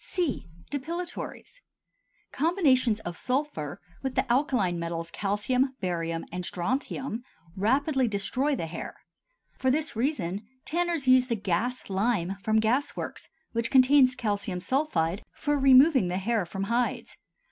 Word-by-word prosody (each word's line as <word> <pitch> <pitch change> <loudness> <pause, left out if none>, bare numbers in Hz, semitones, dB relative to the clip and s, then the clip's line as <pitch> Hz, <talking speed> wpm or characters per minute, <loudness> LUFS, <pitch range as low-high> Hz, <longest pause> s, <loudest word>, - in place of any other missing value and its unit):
C. 345 -8 -2 0.2
Depilatories. 340 - -5 0.7
Combinations 265 - +2
of 175 -3 -5
sulphur 250 - -2 0.2
with 265 -2 -3
the - - +2
alkaline 245 - +1
metals 165 0 -4
calcium, 250 +8 0
barium, 165 -3 -2
and 180 +1 -4
strontium 240 +6 -3 0.3
rapidly 265 +6 +2
destroy 230 +8 0
the 170 - -3
hair; 165 +1 -6 0.6
for 260 - +2
this 300 0 0
reason 215 - -1 0.2
tanners 340 -4 -1
use 255 0 +6
the 235 - 0
"gas 210 +5 -2
lime" 195 -2 0
from 220 +1 +2
gas 240 +6 +1
works, - - -6 0.2
which 230 0 -1
contains 260 0 +6
calcium 205 -6 -2
sulphide, 195 - 0
for 290 -1 0
removing 265 - +6
the 180 +1 -1
hair 210 -1 0
from 195 +2 -4
hides. 235 +4 -1
240 Hz, 130 wpm, -27 LUFS, 195-275 Hz, 0.7 s, use